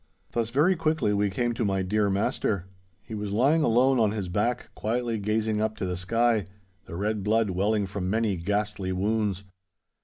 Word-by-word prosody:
Thus 115 -1 -1
very 150 +10 +3
quickly 155 -9 +1
we 100 0 +1
came 120 +4 -1
to 115 - -2
my 95 -2 0
dear 105 +2 +1
master. 100 -1 0 0.4
He 115 - -10
was 105 -1 -4
lying 140 +9 +3
alone 130 +1 +4
on 110 -2 +4
his 100 -4 -3
back 110 +7 -1
quietly 115 0 -2
gazing 105 +1 0
up 110 0 0
to 95 - -2
the 90 -1 -2
sky, 110 +2 +1 0.4
the 85 - -8
red 105 +2 -1
blood 110 0 +2
welling 100 +3 +1
from 95 -1 -4
many 110 -1 +1
ghastly 100 +1 -2
wounds. 100 0 0
105 Hz, 180 wpm, -27 LUFS, 100-115 Hz, 0.4 s, alone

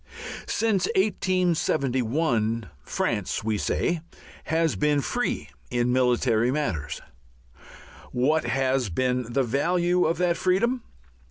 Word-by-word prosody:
Since 215 -5 +1
1871 145 - +1
France, - - -2
we 110 -1 0
say, 170 -2 0 0.4
has 160 0 +1
been 150 -1 +2
free 245 - -2 0.2
in 120 0 +1
military 125 -2 +2
matters. 90 - -2 1.1
What 145 +5 +2
has 130 -1 +1
been 125 +5 -1
the 135 +2 +2
value 175 +8 +1
of 165 - +1
that 175 -1 +1
freedom? 235 +8 +1
140 Hz, 100 wpm, -26 LUFS, 120-175 Hz, 1.1 s, been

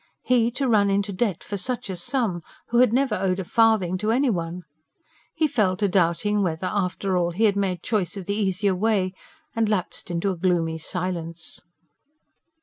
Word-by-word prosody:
He 240 -2 +3
to 270 +1 -1
run 205 -4 +4
into 200 +1 0
debt 195 -3 -1
for 205 - -4
such 240 +5 -3
a 190 - -4
sum, 185 -1 -1 0.3
who 240 - +3
had 250 -3 +5
never 260 -1 +2
owed 185 -2 0
a - - -2
farthing 205 -3 +2
to 210 +2 -1
anyone! 180 -9 0 0.7
He 320 -1 +2
fell 205 -9 +1
to 205 0 +1
doubting 195 +3 +1
whether, 170 -1 -1
after 190 -1 -1
all, 175 -1 +2
he 180 +6 -1
had 205 -2 +4
made 185 -4 -1
choice 205 -3 -1
of 190 - -6
the 200 - -1
easier 200 -1 +1
way, 190 -1 +1 0.4
and 225 -2 +1
lapsed 195 -4 -2
into 175 +3 0
a - - -3
gloomy 165 -2 0
silence. 170 -1 -4
195 Hz, 180 wpm, -24 LUFS, 180-220 Hz, 0.7 s, had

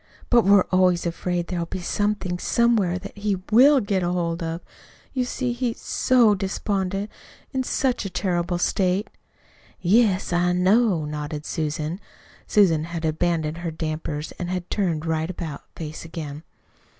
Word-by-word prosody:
But 240 -2 +5
we're 200 -1 +6
always 185 -2 +3
afraid 175 +1 -1
there'll 170 -1 -3
be - - -4
somethin' 190 -1 -1
somewhere 220 -7 +2
that 200 +2 -9
he 205 -1 0 0.2
WILL 270 +5 +7
get 200 -2 0
hold 175 -1 -1
of. 165 +1 -3 0.5
You 255 -2 0
see, 250 0 -2
he's 240 -1 -2
SO 240 -4 +3
despondent 195 0 -2 0.4
in 265 - +1
such 260 0 0
a 195 - -4
terrible 175 -1 -1
state!" 185 +3 0 0.7
"Yes, 195 -1 +3
I 175 0 +2
know," 185 -2 +3
nodded 150 0 -5
Susan. 155 +1 -2 0.5
Susan 165 -7 +4
had 170 -1 -4
abandoned 160 0 0
her 170 -1 -3
dampers, 155 -1 -4
and 175 -1 -3
had 180 -1 -4
turned 170 -6 0
right 160 0 -1
about 165 -5 -6
face 155 -1 -6
again. 155 -3 -7
180 Hz, 145 wpm, -24 LUFS, 165-205 Hz, 0.7 s, WILL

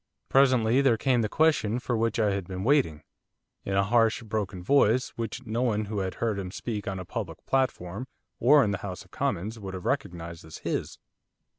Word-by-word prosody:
Presently 130 -2 +4
there 130 -5 +4
came 125 0 +2
the 110 - -1
question 150 -8 +2
for 125 -1 -2
which 115 +2 0
I 105 -2 +3
had 95 -2 -3
been 95 0 -5
waiting, 120 - +2 0.6
in 95 - -2
a 100 - +4
harsh, 115 +2 +2
broken 100 -4 -3
voice 125 0 +3
which 115 +2 -5
no 115 +2 -2
one 110 -4 +1
who 105 0 -3
had 95 -1 -3
heard 110 -4 -1
him 95 -2 -4
speak 105 +2 -5
on 95 -1 -2
a 90 - -6
public 95 -6 -6
platform, 125 -4 -1 0.3
or 140 +4 +6
in 105 - 0
the 95 - -2
House 95 -3 -6
of - - -25
Commons, 110 +6 -2
would 95 -2 -6
have 90 - -7
recognised 85 - -3
as 80 -1 -10
his. - - -3
110 Hz, 200 wpm, -27 LUFS, 95-125 Hz, 0.6 s, or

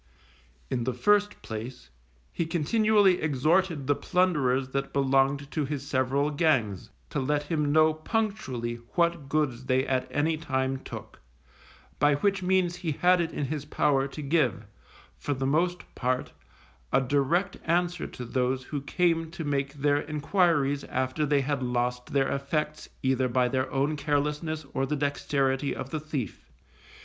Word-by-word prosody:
In 120 -2 -1
the 130 -1 -1
first 205 +9 +2
place, 115 - -7 0.4
he 170 - -1
continually 195 +3 +3
exhorted 160 +2 +1
the 145 - +3
plunderers 140 -8 +1
that 135 +1 -3
belonged 140 +1 +2
to 155 - -1
his 140 -1 -4
several 140 +2 +1
gangs, 130 - +1 0.2
to - - -1
let 145 +2 0
him 150 -1 0
know 155 +1 +5
punctually 155 - -2 0.2
what 170 -5 +1
goods 135 -5 0
they 130 0 +2
at 130 -2 0
any 155 +2 +1
time 130 -4 -1
took, - - -9 0.8
by 145 0 +4
which 195 +6 +1
means 180 -1 +1
he 170 -4 -2
had 180 +4 +4
it 165 -1 -2
in 145 - -2
his 145 +1 -3
power 140 -2 +1
to 150 +2 -7
give, 140 - +1 0.5
for 145 - -2
the 135 +1 -2
most 175 +6 +1
part, 130 +1 -1 0.6
a - - +4
direct 145 +8 +1
answer 175 +1 0
to 125 - -8
those 130 +1 0
who 145 +1 -4
came 165 +1 +1
to 170 0 -6
make 140 -1 -1
their 145 0 +2
enquiries 150 -2 +2
after 130 +4 -1
they 140 -1 +3
had 140 0 -1
lost 125 0 -1
their 135 -1 +1
effects, 150 +2 -2
either 130 -1 +2
by 125 0 +2
their 130 +1 -1
own 140 +3 +1
carelessness, 150 +2 -1
or 135 0 0
the 150 - -1
dexterity 140 -1 0
of 130 - -6
the 155 - -2
thief. 145 -6 -5
145 Hz, 155 wpm, -28 LUFS, 130-160 Hz, 0.8 s, know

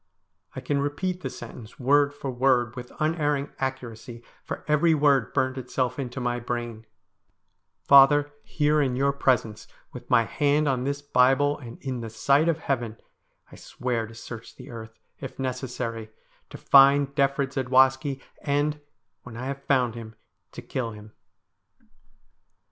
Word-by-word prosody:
I - - -5
can 140 -1 -1
repeat 180 +6 -2
the 130 - -4
sentence 120 -2 -11
word 145 +2 +3
for 145 -2 -6
word 125 -2 +1
with 125 -1 -8
unerring 150 -3 0
accuracy, 120 -3 -5 0.2
for - - -7
every 155 +2 +3
word 140 -4 +3
burned 130 0 0
itself 125 0 -2
into 130 -1 -4
my 120 -1 -1
brain: 120 -2 -5 0.5
' - - -52
Father, 145 +1 +6
here 150 0 +1
in 130 -3 0
your 140 +2 +1
presence, 120 -6 0 0.3
with - - -10
my 115 - +5
hand 145 +5 +1
on 130 -2 0
this 140 +1 -3
Bible, 145 +2 +3
and 120 -4 -10
in 130 -3 -3
the 115 -1 -6
sight 140 +8 +2
of 165 - +1
Heaven, 120 -7 -3 0.5
I - - -12
swear 120 -3 -3
to 115 - -13
search 115 0 -10
the - - -12
earth, 115 -1 -10 0.2
if 135 - -8
necessary, 125 -4 -4 0.4
to - - -9
find 140 0 +5
Defrid 140 -1 0
Zadwaski, 130 +1 +2 0.2
and, 150 +1 0 0.4
when 120 -2 -11
I 125 - -5
have 140 +1 -5
found 125 -4 +2
him, 115 -1 -9 0.4
to - - -9
kill 115 -4 -4
him.' 105 0 -12
130 Hz, 155 wpm, -25 LUFS, 120-145 Hz, 0.5 s, Father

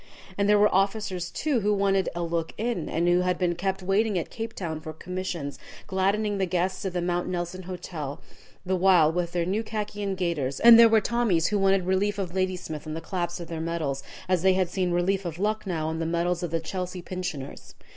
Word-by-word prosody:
And 200 +1 +1
there 210 - +6
were 210 +1 +4
officers, 195 -2 0
too, 290 -6 0
who 210 0 +1
wanted 195 -1 +2
a 175 - -2
"look 165 -1 -2
in," 225 -6 -2
and 170 +2 0
who 175 +1 +4
had 180 0 +1
been 180 -2 +1
kept 190 +2 -2
waiting 200 +2 +2
at 170 - -3
Cape 225 0 -5
Town 160 -4 -4
for 155 0 -7
commissions, 175 -4 -5 0.3
gladdening 200 +2 0
the 190 - +1
guests 180 +1 -1
of 190 - -2
the 175 -1 -1
Mount 175 0 -1
Nelson 180 0 -3
Hotel 175 -6 -6 0.5
the 190 +1 +1
while 180 -4 +5
with 175 0 -2
their 175 -1 0
new 195 +5 0
khaki 210 -2 -4
and 195 -2 -2
gaiters, 155 -7 -1
and 230 0 +9
there 230 -1 +9
were 220 -1 +5
Tommies 210 -7 +1
who 210 - +1
wanted 195 -1 +3
"Relief 195 +2 +1
of 185 -4 -3
Ladysmith" 180 -5 -2
on 155 - -4
the - - -3
claps 175 +1 -3
of 170 - -7
their 165 -1 -4
medals, 160 -5 -2 0.3
as 185 -2 +2
they 190 +1 +5
had 185 -2 +1
seen 185 0 0
"Relief 185 +3 +1
of 170 -2 -5
Lucknow" 195 -5 -1
on 160 0 -3
the 165 - -1
medals 170 +1 0
of 175 - -2
the 165 +1 0
Chelsea 180 +2 -5
pensioners. 170 -7 -6
180 Hz, 220 wpm, -26 LUFS, 170-195 Hz, 0.5 s, and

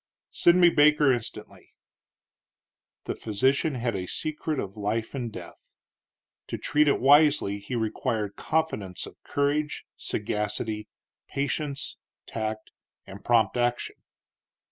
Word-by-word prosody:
"Send 175 +1 +4
me 175 -1 +7
Baker 150 -2 +5
instantly." 120 -3 -7 1.3
The - - -3
physician 130 +7 +1
had 120 -3 -1
a 90 -1 -3
secret 155 - -2
of 100 0 -5
life 110 +2 -2
and 125 -4 -3
death. 90 -4 -12 0.7
To - - -4
treat 150 0 +2
it 140 - +3
wisely 140 -6 +5
he 100 +5 -5
required 110 -2 -1
confidants 130 - -2
of - - -14
courage, 145 +1 -1
sagacity, 105 +1 -3 0.4
patience, 140 0 -3 0.3
tact, 110 -1 -4 0.3
and 95 +1 -11
prompt 115 -3 +3
action. 120 0 -1
120 Hz, 115 wpm, -27 LUFS, 105-145 Hz, 1.3 s, me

